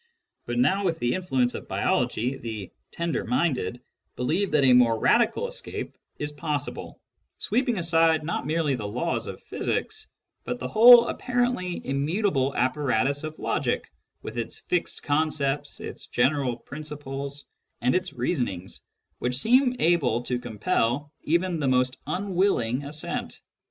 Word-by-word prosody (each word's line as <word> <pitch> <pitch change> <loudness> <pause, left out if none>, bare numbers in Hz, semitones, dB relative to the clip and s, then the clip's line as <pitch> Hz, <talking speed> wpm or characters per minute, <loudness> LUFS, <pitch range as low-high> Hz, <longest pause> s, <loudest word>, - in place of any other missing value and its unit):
But 120 0 -2
now, 165 +11 +3
with 170 -4 0
the 120 -5 0
influ 145 -9 0
ence 125 - +1
of - - -7
biology, 125 +5 0
the 110 -6 -6 0.2
"tender 170 -1 -2
minded" 125 - 0 0.4
believe 175 +10 0
that 150 -2 +3
a 130 -1 +6
more 120 -2 +5
'radical 235 - +3
escape - - -5 0.2
is 145 0 -3
possible, 145 -1 -4 0.4
sweeping 240 +1 0
aside 165 -2 +3
not 150 -3 -3
merely 155 -2 +1
the 110 -5 -3
laws 125 +11 -2
of - - -8
physics, 435 0 -3 0.4
but 245 - -3
the - - -4
whole 235 +2 +8
apparently 245 -8 -1
immutable 140 0 0
apparatus 130 +1 +1
of 155 0 -6
logic, - - -1 0.3
with 120 - -5
its 115 - -4
fixed 180 -1 -2
concepts, 145 -2 0
its - - -8
general 135 -4 +1
principles, 140 0 -7 0.3
and 125 +2 +2
its 185 0 0
reasonings 95 - -3 0.4
which 125 0 -1
seem 250 - +4
able 150 - +2
to 125 0 -2
compel 120 +5 -1
even 170 +2 +1
the 145 - 0
most 125 0 +2
unwilling 180 - 0
assent. 150 +2 -4
145 Hz, 140 wpm, -26 LUFS, 125-180 Hz, 0.4 s, whole